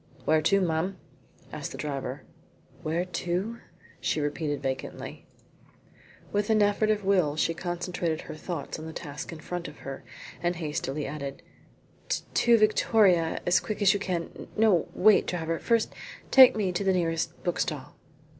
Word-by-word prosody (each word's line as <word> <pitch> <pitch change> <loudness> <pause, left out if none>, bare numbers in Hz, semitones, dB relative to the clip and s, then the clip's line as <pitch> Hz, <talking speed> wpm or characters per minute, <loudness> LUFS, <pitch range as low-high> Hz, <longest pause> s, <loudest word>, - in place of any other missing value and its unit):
"Where 155 0 +4
to, 195 +5 +3
ma'am?" 180 +2 0 0.6
asked - - -5
the - - -7
driver. 140 -2 -4 0.6
"Where 165 +3 -1
to?" 180 +6 -2 0.4
she - - 0
repeated 145 0 -1
vacantly. 130 -1 -5 1.0
With 205 +1 0
an 215 -1 +5
effort 205 +1 +2
of 210 -2 +1
will 180 -7 +3
she 165 +1 +1
concentrated 175 -1 -2
her 155 - -8
thoughts 160 -1 -5
on 160 - -7
the 160 - -7
task 150 +1 -6
in 165 - -8
front 175 0 -4
of 145 - -11
her, 135 0 -6 0.4
and 175 +1 0
hastily 150 -3 -3
added, 140 -1 -6 0.9
"To 235 -1 +5
Victoria, 210 -5 +3
as 175 +1 +4
quick 215 - -4
as 200 -1 +5
you 205 - -1
can. 180 -4 -4
No 210 -7 +3
wait 210 +2 +5
driver, 165 -2 -2
first 230 -2 +1 0.4
take 260 -2 +9
me 200 -4 0
to 180 +3 -1
the 190 -1 +3
nearest 165 -2 -1
bookstall." 175 - -2
175 Hz, 155 wpm, -28 LUFS, 155-200 Hz, 1.0 s, take